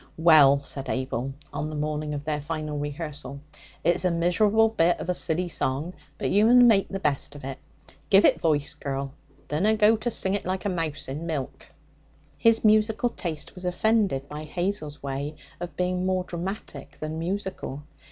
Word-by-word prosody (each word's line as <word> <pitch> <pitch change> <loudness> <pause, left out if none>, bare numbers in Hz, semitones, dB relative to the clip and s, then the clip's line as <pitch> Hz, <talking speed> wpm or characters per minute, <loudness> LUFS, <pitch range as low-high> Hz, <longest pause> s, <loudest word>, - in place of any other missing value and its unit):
'Well,' 150 -4 +6
said 135 -1 -4
Abel 130 0 -2 0.2
on 145 +1 -3
the 155 - -6
morning 150 0 -2
of 145 - -5
their 150 -1 -2
final 155 -1 -4
rehearsal, 145 -2 -5 0.4
'it's 175 +1 +2
a 180 - +3
miserable 200 +6 +3
bit 175 -6 +2
of - - -5
a - - +3
silly 175 +1 -1
song, 155 +1 -2 0.2
but - - -2
you 210 +2 +5
mun 245 +1 +7
make 210 -5 +4
the 195 - -4
best 145 -3 -1
of 145 - -10
it. 135 0 -6 0.5
Give 195 0 +6
it - - +4
voice, 150 -3 +1
girl! 135 -1 -4 0.3
Dunna 195 +9 +2
go 215 +1 +5
to 230 +3 -2
sing 190 -4 0
it 205 - -1
like 185 0 -3
a - - +2
mouse 165 -4 -2
in 150 +5 -5
milk!' 145 -6 -4 0.7
His 230 -1 +4
musical 215 +2 +3
taste 165 -9 -5
was 180 - -10
offended 180 -6 +1
by 150 +1 -7
Hazel's 155 -3 -3
way 140 +2 -4 0.2
of 175 0 -7
being 180 0 0
more 185 0 +1
dramatic 175 -5 -6
than 155 +1 -4
musical. 180 -5 -4
165 Hz, 180 wpm, -26 LUFS, 145-195 Hz, 0.7 s, mun